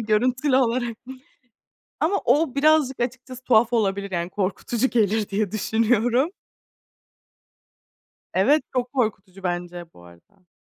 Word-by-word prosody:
görüntülü 250 Hz, +5 st, +1 dB
olarak. 240 Hz, -2 st, 0 dB, 1.0 s
Ama 390 Hz, +6 st, +1 dB
o 275 Hz, +2 st, +2 dB
birazcık 285 Hz, -3 st, +3 dB
açıkçası 255 Hz, +1 st, -5 dB
tuhaf 235 Hz, 0 st, +3 dB
olabilir. 200 Hz, -3 st, 0 dB
Yani 175 Hz, 0 st, -3 dB
korkutucu 210 Hz, +6 st, -1 dB
gelir 215 Hz, -2 st, +1 dB
diye 205 Hz, -1 st, -1 dB
düşünüyorum. 230 Hz, -, +1 dB, 2.0 s
Evet, 275 Hz, +12 st, +3 dB
çok 250 Hz, 0 st, -2 dB
korkutucu 195 Hz, -6 st, -3 dB
bence 175 Hz, -1 st, -4 dB
bu 90 Hz, -, -17 dB
arada. 90 Hz, -, -20 dB
230 Hz, 105 wpm, -23 LUFS, 195-255 Hz, 2.0 s, birazcık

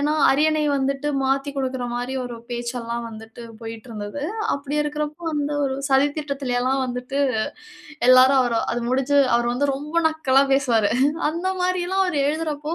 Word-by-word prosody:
ஏனா, 295 Hz, +2 st, +1 dB, 0.2 s
அரியணை 305 Hz, +2 st, +2 dB
வந்துட்டு 275 Hz, +2 st, -1 dB
மாத்திக் 275 Hz, +1 st, -1 dB
குடுக்கிற 260 Hz, -2 st, -2 dB
மாரி 245 Hz, +2 st, -3 dB
ஒரு 240 Hz, -1 st, -6 dB
பேச்செல்லாம் 235 Hz, -1 st, -4 dB
வந்துட்டு 225 Hz, +2 st, -11 dB, 0.2 s
போய்ட்டிருந்தது. 225 Hz, +2 st, -7 dB, 0.3 s
அப்படி 280 Hz, +1 st, -4 dB
இருக்கிறப்போ, 300 Hz, +2 st, -4 dB
வந்து 295 Hz, 0 st, -1 dB
ஒரு 265 Hz, 0 st, -2 dB
சதி 270 Hz, +2 st, +4 dB
திட்டத்திலயெல்லாம் 270 Hz, -3 st, -1 dB
வந்துட்டு 250 Hz, +3 st, -3 dB, 0.9 s
எல்லாரும் 260 Hz, +1 st, +6 dB, 0.3 s
அது 240 Hz, -, -2 dB
முடிஞ்சு 270 Hz, +2 st, +2 dB, 0.2 s
அவர் 240 Hz, 0 st, 0 dB
வந்து 285 Hz, +3 st, 0 dB
ரொம்ப 295 Hz, +3 st, -8 dB
நக்கலா 275 Hz, -4 st, +2 dB
பேசுவாரு. 235 Hz, -7 st, +2 dB, 0.4 s
அந்த 340 Hz, +4 st, -4 dB, 0.2 s
மாரில்லாம் 365 Hz, +1 st, +1 dB
அவர் 345 Hz, -5 st, -1 dB
எழுதுறப்போ, 305 Hz, 0 st, -2 dB
270 Hz, 135 wpm, -22 LUFS, 245-295 Hz, 0.9 s, எல்லாரும்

